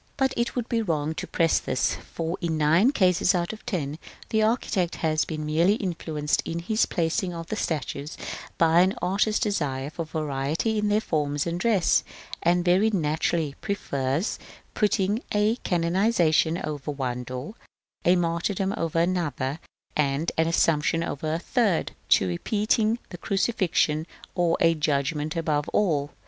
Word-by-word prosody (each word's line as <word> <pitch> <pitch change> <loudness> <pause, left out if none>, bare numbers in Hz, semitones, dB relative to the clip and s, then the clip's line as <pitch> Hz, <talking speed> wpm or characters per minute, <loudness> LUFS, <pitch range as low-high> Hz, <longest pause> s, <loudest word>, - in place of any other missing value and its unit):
But 265 -1 +2
it 235 0 -1
would 245 -2 -2
be 230 -1 0
wrong 160 -6 -1
to - - -5
press 165 -1 +2
this, 130 - 0
for, 165 +1 -4
in 165 -3 -1
nine 165 - +4
cases 185 - +3
out 175 +3 -1
of 215 - -11
ten, 155 - -2 0.3
the 220 - +2
architect 215 -5 +1
has 155 -1 0
been 155 -2 -4
merely 165 +6 +3
influenced 160 -7 -1
in 165 - -4
his 215 +6 +1
placing 175 +2 -1
of 165 0 -5
the - - -1
statues 150 -5 -3 0.4
by 165 +1 +5
an 190 +2 +2
artist's 205 +3 +1
desire 145 - -1
of 165 -1 -3
variety 155 +8 -1
in 210 - 0
their 210 +1 +2
forms 145 -5 -1
and 170 0 -2
dress; 200 -6 +3 0.4
and 175 +1 +2
very 185 +5 +4
naturally 160 -4 0
prefers 140 - -2 0.3
putting 210 +1 +1
a 210 +3 +2
canonisation 170 -3 +2
over 150 -1 -5
one 130 -4 -3
door, 130 - -6 0.5
a 180 - +5
martyrdom 175 +3 0
over 165 -1 -2
another, 165 -5 -1 0.4
and 150 +2 +1
an 160 0 +2
assumption 165 0 +2
over 155 -1 -3
a 160 - 0
third, 200 0 0 0.2
to 95 - +5
repeating 215 - +1
a 175 - -6
crucifixion 185 -6 +1 0.3
or 175 -2 +2
a 165 0 +5
judgment 150 0 -1
above 155 -3 0
all. 150 -9 +1
165 Hz, 155 wpm, -26 LUFS, 150-200 Hz, 0.5 s, by